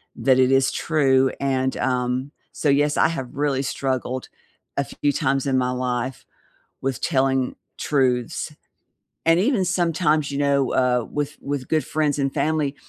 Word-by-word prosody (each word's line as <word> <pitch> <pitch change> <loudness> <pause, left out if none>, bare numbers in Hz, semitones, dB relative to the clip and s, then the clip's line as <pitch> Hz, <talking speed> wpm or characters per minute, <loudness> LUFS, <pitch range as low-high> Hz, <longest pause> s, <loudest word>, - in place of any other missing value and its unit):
that 130 -1 +3
it 130 0 +4
is 135 0 +3
true, 135 -4 +2
and, 130 -1 0
um 125 +2 -1 0.2
so, 150 - 0
yes, 145 +1 +2
I - - +5
have 135 -7 -5
really 140 -2 0
struggled 130 -1 -2 0.5
a 140 - +2
few 145 +1 -1
times 135 +1 0
in 130 -1 +2
my 125 -1 +1
life 125 0 -2 0.6
with 135 -2 -2
telling 135 -4 +1 0.2
truths. 135 +2 0 0.7
And 165 +1 +5
even 220 0 +2
sometimes, 165 -4 +1
you 140 - -3
know, 140 -2 +1
uh, 125 -2 +2
with 145 0 -3
with 140 -2 -4
good 155 -1 +1
friends 150 -2 0
and 135 -1 0
family, 150 -1 0
135 Hz, 155 wpm, -23 LUFS, 130-150 Hz, 0.7 s, I